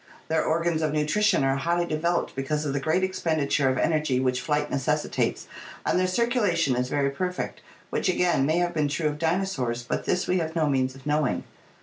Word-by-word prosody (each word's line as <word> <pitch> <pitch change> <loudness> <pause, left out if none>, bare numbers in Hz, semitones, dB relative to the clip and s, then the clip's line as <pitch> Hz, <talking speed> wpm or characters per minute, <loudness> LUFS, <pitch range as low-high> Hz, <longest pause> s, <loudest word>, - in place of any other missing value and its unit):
Their 160 0 +2
organs 165 0 0
of 155 -1 0
nutrition 155 +4 +2
are 135 0 +2
highly 170 +4 0
developed 170 +2 -1
because 150 +3 -2
of 140 - -1
the 140 - 0
great 160 +6 +1
expenditure 155 -7 +1
of 130 - 0
energy 150 -3 +1
which 130 -1 0
flight 150 -1 -1
necessitates 150 +3 -1 0.4
and - - +2
their 185 - +2
circulation 185 - +1
is 125 +1 -1
very 140 -1 +1
perfect, 180 +5 -3 0.3
which - - 0
again 175 -5 +2
may 160 +2 +2
have 175 0 +1
been 155 -3 +1
true 150 +2 0
of 150 0 -6
dinosaurs, 160 -9 -1
but 120 - -3
this 180 - 0
we 180 0 +2
have 160 0 -3
no 160 -2 +2
means 130 -2 0
of 135 - -15
knowing. 150 -2 0
155 Hz, 200 wpm, -26 LUFS, 140-175 Hz, 0.4 s, Their